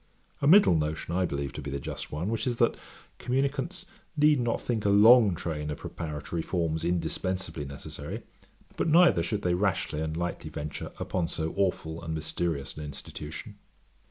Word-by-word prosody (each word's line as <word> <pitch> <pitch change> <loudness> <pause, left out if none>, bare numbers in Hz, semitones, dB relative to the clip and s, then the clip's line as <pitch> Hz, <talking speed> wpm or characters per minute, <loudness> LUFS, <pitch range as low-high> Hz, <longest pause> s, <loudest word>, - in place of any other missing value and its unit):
A 140 - +2
middle 190 - +8
notion 80 +2 -2
I 90 0 +2
believe 70 -2 -3
to - - -6
be 70 - -5
the 70 0 -3
just - - -5
one, 80 +7 -2
which 115 +3 -1
is, 120 - +1
that 115 0 +3 0.5
communicants 140 +7 -1 0.3
need 150 -1 +5
not 120 -1 0
think 115 -4 -2
a 100 - +2
long 105 0 +7
train 75 -3 -3
of 75 - -3
preparatory 75 0 -4
forms 80 -2 -1
indispensibly 85 -2 -2
necessary; 70 0 -7 0.5
but - - +1
neither 165 - +6
should 100 +4 -2
they 90 - +2
rashly 90 -4 0
and 80 0 -2
lightly 85 +1 -3
venture 75 0 -5
upon 90 -2 -1
so 80 0 -3
aweful 85 -4 -1
and 80 -1 -3
mysterious 80 -2 -2
an 75 - -5
institution. 75 +2 -8
85 Hz, 170 wpm, -28 LUFS, 80-105 Hz, 0.5 s, middle